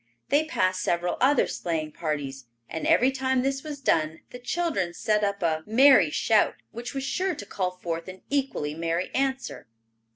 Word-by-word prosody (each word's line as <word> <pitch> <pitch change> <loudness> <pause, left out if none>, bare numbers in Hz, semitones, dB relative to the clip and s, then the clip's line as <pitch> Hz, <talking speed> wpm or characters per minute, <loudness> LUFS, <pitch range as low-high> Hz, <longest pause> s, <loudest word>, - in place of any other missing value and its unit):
They 295 +2 +3
passed 185 - 0
several 175 0 0
other 275 +3 +4
sleighing 160 -3 -3
parties, 140 -5 -4 0.2
and 160 - -4
every 255 +2 +4
time 260 -1 0
this 270 0 -1
was 295 -1 -7
done 160 - +1
the 245 - -8
children 245 - -1
set 215 0 +1
up 200 -2 -1
a 160 -1 +1
merry 250 - +6
shout 215 +7 +2 0.2
which 240 +3 -7
was 270 - -2
sure 360 +6 -1
to 205 - -8
call 185 -2 -2
forth 170 -2 -5
an 185 0 -10
equally 270 - -1
merry 165 +2 -2
answer. 265 - -2
205 Hz, 170 wpm, -26 LUFS, 165-270 Hz, 0.2 s, merry